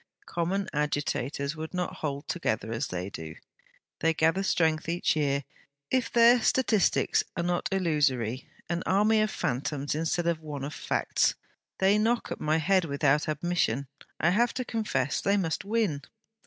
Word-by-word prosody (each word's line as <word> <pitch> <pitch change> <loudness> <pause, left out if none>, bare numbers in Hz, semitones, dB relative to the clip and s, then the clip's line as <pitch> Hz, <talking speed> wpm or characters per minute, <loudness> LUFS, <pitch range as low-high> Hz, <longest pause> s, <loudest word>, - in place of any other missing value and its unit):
Common 185 +3 -1
agitators 145 -1 -1
would 160 +3 -6
not 180 +1 -2
hold 140 -2 -4
together, 110 -10 -2
as 120 +5 -2
they 90 +2 -4
do. 80 -2 -7 0.6
They 165 0 +2
gather 165 +4 +2
strength 160 -4 +1
each 175 0 +1
year. 140 -2 +1 0.5
If 255 -2 +1
their 235 +1 +6
statistics 220 -4 +2
are 170 - 0
not 175 0 -1
illusory 145 - 0 0.2
an 170 0 -2
army 215 +3 +4
of 215 - +1
phantoms 140 - -2
instead 165 +2 -1
of 170 -2 +1
one 150 -3 -6
of 145 +2 -4
facts; - - +1
and - - -44 0.4
they 195 +2 +3
knock 230 +2 0
at - - -5
my 155 +1 +2
head 185 +4 +3
without 145 +1 +1
admission, 155 -4 0 0.3
I 170 - +3
have 235 +5 +2
to 255 - -2
confess; 215 - -1
they 200 +1 +2
must 170 -1 -1
win.' 205 -9 0
160 Hz, 160 wpm, -28 LUFS, 145-195 Hz, 0.6 s, their